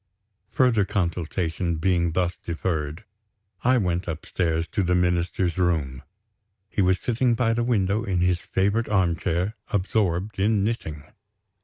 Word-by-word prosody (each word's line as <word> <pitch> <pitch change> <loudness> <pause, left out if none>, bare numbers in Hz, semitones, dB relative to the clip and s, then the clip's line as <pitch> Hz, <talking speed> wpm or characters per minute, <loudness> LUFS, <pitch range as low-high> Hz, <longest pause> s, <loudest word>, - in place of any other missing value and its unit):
Further 120 -4 +3
consultation 85 -2 -1
being 85 0 +1
thus 90 0 0
deferred, 80 +1 -3 0.6
I 125 +1 +4
went 90 -4 -1
upstairs 80 0 -1
to 105 - -1
the 90 -1 +2
Minister's 90 0 0
room. 75 -8 0 0.7
He - - 0
was 95 -1 +3
sitting 120 +2 +1
by 115 -2 +2
the 120 +1 0
window, 105 -2 +1
in 95 -5 -1
his 90 0 +2
favorite 100 +6 0
armchair, 90 0 0
absorbed 95 -1 0
in 105 0 +2
knitting! 80 -10 -3
90 Hz, 130 wpm, -25 LUFS, 85-105 Hz, 0.7 s, I